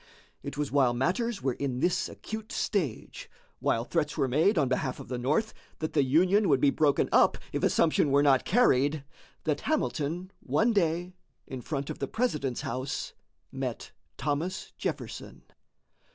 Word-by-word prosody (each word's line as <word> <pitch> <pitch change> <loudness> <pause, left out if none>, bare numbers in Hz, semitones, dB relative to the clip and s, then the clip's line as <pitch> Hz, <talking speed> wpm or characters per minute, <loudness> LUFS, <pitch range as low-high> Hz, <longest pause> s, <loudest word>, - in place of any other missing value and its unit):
It 135 - -7
was 150 -1 -2
while 130 -4 +3
matters 200 - -1
were 130 - +1
in 130 -1 -3
this 180 +5 +1
acute 220 0 -7
stage, 160 - -2 0.3
while 115 +1 0
threats 150 -1 -1
were 140 -3 +2
made 160 - +3
on 145 -4 +3
behalf 130 +1 -1
of - - -10
the 125 -1 -3
North 150 - 0 0.2
that 155 - -4
the 145 - +4
Union 180 +9 +3
would 135 -3 +4
be 140 +1 +4
broken 145 -2 +2
up - - +5 0.2
if - - -1
assumption 155 -2 +3
were 140 +1 +4
not 135 -3 +4
carried, 145 - +3 0.4
that 150 -2 -1
Hamilton 180 - -1
one 230 +1 +1
day 175 -2 0 0.3
in 130 -2 -7
front 140 0 -3
of - - -8
the 140 - -2
President's 150 - -1
house 130 +3 -4 0.4
met - - -5 0.3
Thomas 150 +7 -2
Jefferson. - - -5
150 Hz, 160 wpm, -29 LUFS, 135-180 Hz, 0.4 s, up